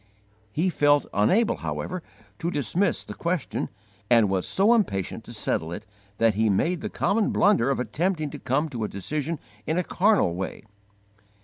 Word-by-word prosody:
He 175 - +1
felt 145 -2 +3
unable, 215 - +3
however, 185 -1 -4 0.4
to 170 -1 -1
dismiss 170 +5 0
the - - -7
question, 170 -3 -2 0.4
and 115 -5 +5
was 95 -2 0
so 205 +5 +4
impatient 100 - 0
to - - -10
settle 80 +1 -1
it 85 - -6 0.3
that 115 -1 +3
he 110 +2 +2
made 165 - +1
the - - -3
common 210 +1 +1
blunder 195 - +3
of 135 - 0
attempting 155 - -1
to - - -7
come 135 +5 0
to 120 -6 -4
a - - 0
decision 150 - -3 0.3
in 160 - 0
a 180 - +2
carnal 200 - +2
way. 95 +3 -5
150 Hz, 170 wpm, -25 LUFS, 110-185 Hz, 0.4 s, and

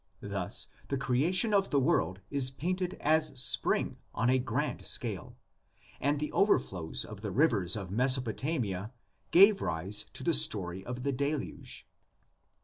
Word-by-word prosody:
Thus - - -1 0.2
the 140 - -2
creation 155 - +2
of 195 -1 +2
the 140 - +2
world 95 -7 0
is 140 -2 +3
painted 180 +7 -3
as 155 -3 +2
Spring 135 +2 +2 0.2
on 125 +3 +2
a 130 - +3
grand 125 - -2
scale, - - -3 0.6
and 145 +1 0
the 150 - -3
overflows 90 - 0
of 105 -2 -10
the 105 - -4
rivers 100 - +2
of 95 -4 -6
Mesopotamia 125 - 0 0.4
gave 195 +3 +6
rise 100 +6 -1
to - - -4
the 170 - +2
story 95 - 0
of 125 +3 -6
the 140 - 0
Deluge. 140 +2 -4
130 Hz, 140 wpm, -30 LUFS, 105-155 Hz, 0.6 s, gave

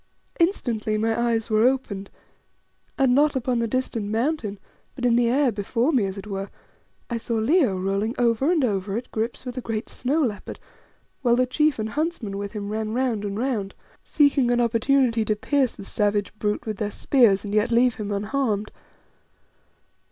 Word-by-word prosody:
Instantly 235 - 0
my 225 +1 +1
eyes 235 -1 0
were 215 +1 +4
opened, 235 -7 0 0.9
and, 265 -2 +3
not 290 +2 +3
upon 250 -1 0
the 230 - 0
distant 230 -3 -2
Mountain, 225 -1 -1 0.4
but 250 - -3
in 240 -1 +4
the 240 0 +3
air 265 +1 +3
before 230 +7 0
me 225 -7 +2
as 190 +1 -6
it 195 - -7
were, 195 -1 -5 0.6
I 235 - 0
saw 230 0 -3
Leo 230 - +2
rolling 195 +5 -1
over 240 +5 +2
and 325 -6 +2
over 200 -2 -1
at 240 - -7
grips 225 +4 -3
with 250 0 -4
a - - -5
great 225 -2 -4
snow 290 +5 0
leopard, 215 -6 -4 0.6
whilst 240 -3 +3
the 255 - +3
chief 300 +3 +1
and 215 0 -3
huntsmen 285 -9 -3
with 200 0 -5
him 205 -2 -5
ran 215 0 -3
round 240 -4 0
and 200 0 -3
round, 225 -5 -2 0.3
seeking 285 -4 +3
an 245 0 +2
opportunity 235 0 +2
to 215 0 0
pierce 265 +3 0
the 200 - -10
savage 205 -1 0
brute 210 0 -1
with 215 -2 -4
their 210 0 -2
spears 210 -4 +3
and 205 - -5
yet 210 +1 +2
leave 240 +1 +4
him 210 -2 -5
unharmed. 210 0 -1
230 Hz, 180 wpm, -24 LUFS, 210-255 Hz, 0.9 s, were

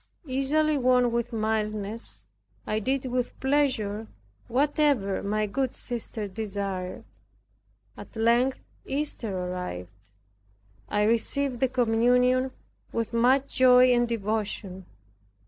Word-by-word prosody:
Easily 290 +3 +1
won 250 -1 +3
with 235 0 -1
mildness, 215 - -3 0.4
I 215 - 0
did 265 +4 -1
with 250 -1 -2
pleasure 255 -7 0 0.4
whatever 275 -6 +1
my 210 +1 0
good 255 +5 -2
sister 230 -3 -5
desired. 195 -3 -4 0.9
At - - -12
length 235 +4 +3 0.3
Easter 275 -6 -3
arrived; 105 - -6 0.8
I 210 - +1
received 240 +4 +1
the 265 - +2
communion 250 +1 +3 0.4
with 230 0 -2
much 260 +4 +2
joy 255 0 +7
and 240 0 +2
devotion. 210 -4 -3
235 Hz, 100 wpm, -27 LUFS, 210-255 Hz, 0.9 s, joy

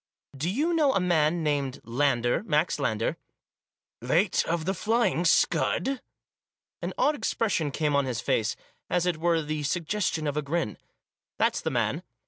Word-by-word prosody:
"Do 150 +6 -2
you 300 - 0
know 300 -5 +3
a - - +4
man 170 -2 +2
named 140 -4 -1
Lander, 120 -1 +1
Max 155 -4 +1
Lander 115 -5 -1 0.3
?" - - -67
" - - -67
Late 180 +4 +3
of 165 -1 -1
The 190 - +1
Flying 220 -3 +1
Scud? 260 +9 +2 0.4
" - - -67
An - - -3
odd 300 - +3
expression 210 - 0
came 150 +1 0
on 140 -1 +2
his 125 -4 -2
face, 110 0 0 0.3
as 180 -1 +1
it 175 -3 0
were 165 0 +1
the 150 0 -3
suggestion 165 +2 -1
of 145 -1 -1
a 150 - 0
grin. 150 -5 -2 0.3
" - - -67
That's - - +1
the - - -1
man." - - 0
160 Hz, 175 wpm, -27 LUFS, 145-180 Hz, 0.4 s, a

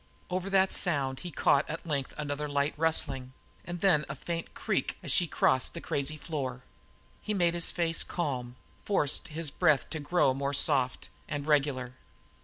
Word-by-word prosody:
Over 185 +1 -2
that 190 -1 +3
sound 140 -7 +3
he 180 - -6
caught 140 -1 +2
at 165 - -5
length 140 -5 -2
another 150 0 -3
light 145 0 0
rustling, 145 -5 0 0.3
and 175 0 -6
then 170 -7 +4
the 140 - -5
faint 165 +4 -5
creak - - -1
as - - -1
she 175 - +3
crossed 130 -3 +1
the - - -4
crazy 145 +2 -2
floor. 135 -5 -4 0.6
He 210 - -2
made 175 -3 +3
his 170 -1 +4
face 165 -1 +1
calm 130 -8 -3 0.3
forced 150 -8 0
his 155 -1 -3
breath 155 -7 +2
to 160 - -3
grow 145 -2 +2
more 140 +1 -2
soft 135 -3 +1 0.2
and 145 -1 -4
regular. 140 -4 +1
150 Hz, 170 wpm, -30 LUFS, 140-170 Hz, 0.6 s, then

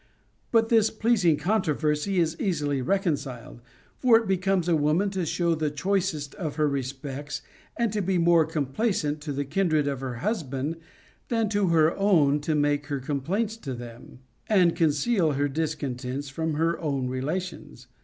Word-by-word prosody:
But 225 -1 +3
this 225 -2 +4
pleasing 215 -8 +2
con 200 +8 +1
troversy 155 +2 0
is 165 -2 +1
easily 145 -8 0
reconciled. 140 - -2 0.4
For 245 -3 +6
it 225 -2 -2
becomes 190 -1 +1
a 170 - +3
woman 155 +7 +1
tc 185 -4 -2
show 170 +2 +1
the 155 -1 -1
choicest 155 -2 -1
of 165 -8 -5
her 155 -1 +2
respects 140 +1 -4 0.3
and 235 -3 0
to 210 - 0
be 190 0 0
more 170 -2 +4
com 155 -3 -1
plaisant 150 - -1
to 145 0 -5
the 140 +1 -2
kindred 155 -1 +1
of 140 -2 -2
her 130 -2 -4
husband 150 - -2 0.5
than 225 -3 0
to 205 -2 +1
her 165 -1 +3
own 160 -8 +3
to 155 +1 -1
make 145 0 +1
her 140 -2 -2
complaints 170 - -2
to 135 - -6
them, 120 +1 -11 0.3
and 185 -6 +4
conceal 160 +2 +2
her 140 +1 +1
discon 145 -2 -2
tents 135 +3 -5
from 160 +2 -2
her 165 +2 0
own 140 -5 -1
relations. 140 +1 -4
155 Hz, 170 wpm, -26 LUFS, 145-190 Hz, 0.5 s, For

